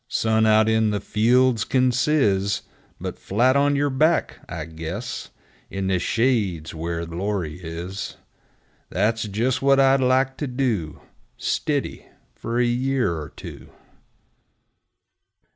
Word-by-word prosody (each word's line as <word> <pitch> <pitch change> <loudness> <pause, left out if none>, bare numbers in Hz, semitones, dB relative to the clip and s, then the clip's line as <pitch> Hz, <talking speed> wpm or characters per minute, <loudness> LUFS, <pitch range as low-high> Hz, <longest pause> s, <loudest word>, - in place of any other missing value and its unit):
Sun 110 -2 +2
out 110 0 +5
in 110 -1 +3
the 105 -1 -1
fields 120 +2 +2
kin 130 -1 +2
sizz, 105 -7 +1 0.4
But - - -6
flat 125 +7 +2
on 145 0 +3
yer 145 0 +1
back, 155 +5 +1
I 80 -3 -5
guess, 85 +9 -6 0.4
In 95 0 -3
the 95 -1 +1
shade's 100 -10 0
where 85 +1 -3
glory 90 -1 -3
is! 85 +4 -6 0.7
That's 110 +4 0
jes' 120 +5 -1
what 135 0 +4
I'd 135 0 +5
like 130 +1 +2
to 145 - -3
do 120 - -2 0.4
Stiddy - - -2 0.3
fer 115 +1 -4
a 125 - +3
year 125 -2 +1
er 75 -2 -6
two! - - -10
110 Hz, 125 wpm, -23 LUFS, 95-130 Hz, 0.7 s, out